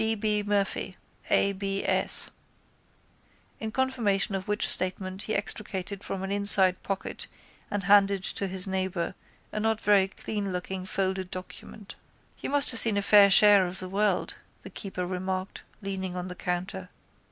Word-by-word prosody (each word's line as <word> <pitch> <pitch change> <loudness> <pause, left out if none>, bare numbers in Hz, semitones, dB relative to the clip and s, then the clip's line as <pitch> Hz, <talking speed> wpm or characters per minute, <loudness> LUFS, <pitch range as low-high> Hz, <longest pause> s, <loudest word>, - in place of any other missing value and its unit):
D. 220 0 0
B. 210 -1 0
Murphy. 200 -2 -2 0.3
A. 200 - +3
B. 195 0 -3
S. - - +1 1.3
In 220 - -4
confirmation 230 -7 0
of 190 +1 -4
which 210 0 +1
statement 185 +1 +3
he 220 - -2
extricated 200 -1 -4
from 190 -1 -5
an 195 - -4
inside 200 -2 +6
pocket 195 -1 -5 0.4
and 205 -1 -3
handed 200 0 +3
to 195 - -2
his 190 0 -1
neighbour 190 -2 -3 0.4
a 215 - -4
not 220 0 0
very 200 -3 +3
cleanlooking 190 -2 -5
folded 190 -1 -2
document. 190 +3 -10 0.5
—You - - -5
must 285 -1 +2
have 230 - +4
seen 220 -3 +5
a 200 - 0
fair 205 -1 +6
share 205 0 +6
of 180 +2 -6
the 185 0 -6
world, 200 -1 0 0.3
the - - -10
keeper 190 -3 -5
remarked, 185 +1 -5 0.2
leaning 190 -2 -5
on 180 0 -5
the - - -6
counter. 180 +1 -5
195 Hz, 155 wpm, -27 LUFS, 185-205 Hz, 1.3 s, inside